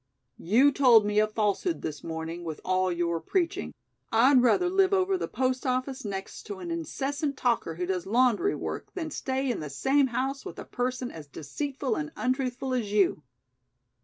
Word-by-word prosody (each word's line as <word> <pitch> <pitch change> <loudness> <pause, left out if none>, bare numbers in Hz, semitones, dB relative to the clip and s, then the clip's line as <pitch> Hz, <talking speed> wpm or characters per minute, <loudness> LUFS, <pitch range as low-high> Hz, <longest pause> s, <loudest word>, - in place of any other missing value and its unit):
"You 245 +11 +4
told 245 -6 +6
me 210 0 +2
a 215 - +4
falsehood 215 - -1
this 150 -1 -5
morning 165 +1 -5
with 160 -3 -5
all 185 0 +1
your 170 -1 0
preaching. 335 - -1 0.4
I'd 250 +4 +6
rather 250 +9 +3
live 380 +1 +3
over 380 0 +2
the 370 - -2
post 255 0 -1
office 255 +1 -1
next 195 -2 -5
to 205 - -5
an 175 -2 -6
incessant 275 - -2
talker 235 -11 0
who 180 +2 -2
does 180 -1 -2
laundry 250 - +3
work - - -5
than 320 -4 -4
stay 265 -1 -1
in - - -3
the 150 - -5
same 270 - +2
house 265 +3 -2
with - - -8
a - - -7
person 250 0 -3
as 155 -3 -10
deceitful 260 - -3
and 150 -1 -4
untruthful 255 0 -1
as 230 -5 -1
you. 200 -7 +2
245 Hz, 180 wpm, -28 LUFS, 185-270 Hz, 0.4 s, told